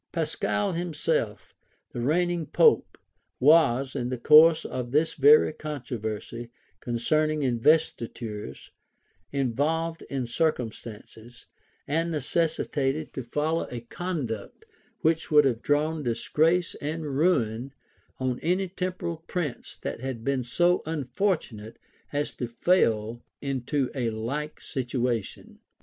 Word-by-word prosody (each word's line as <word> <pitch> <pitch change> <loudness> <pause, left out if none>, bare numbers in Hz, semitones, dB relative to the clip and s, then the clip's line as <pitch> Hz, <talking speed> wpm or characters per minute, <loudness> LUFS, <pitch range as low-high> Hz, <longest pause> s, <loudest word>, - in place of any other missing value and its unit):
Pascal 205 -2 -1
himself, 160 - -2 0.4
the 120 - -4
reigning 170 +4 +1
pope, 455 - +3 0.4
was, 135 -3 +4
in 125 -3 -2
the 130 - -2
course 155 +5 +7
of 125 -1 -4
this 150 +5 +2
very 150 +2 +6
controversy 120 -6 -5 0.3
concerning 155 +7 0
investitures, 115 - 0 0.6
involved 150 +5 -1
in 135 -2 -2
circumstances, 120 -3 -4 0.4
and 165 +4 0
necessitated 155 -1 -1
to 130 - -4
follow 150 +7 -1
a 120 -1 -6
conduct 125 - -5 0.4
which 160 0 +1
would 150 -2 +6
have 120 -4 +1
drawn 155 +2 +1
disgrace 155 +8 +1
and 155 +2 -3
ruin 130 -6 +1 0.5
on 130 -1 -2
any 185 +4 0
temporal 180 -2 -4
prince 160 -9 -4
that - - -4
had 130 -2 -5
been 135 0 0
so 175 +8 +2
unfortunate 140 - -2 0.3
as 145 0 -2
to 125 - -4
fail 115 - +1 0.2
into 135 0 -1
a 125 -4 -1
like 130 +8 -4
situation. 125 -4 -3
140 Hz, 110 wpm, -27 LUFS, 120-160 Hz, 0.6 s, course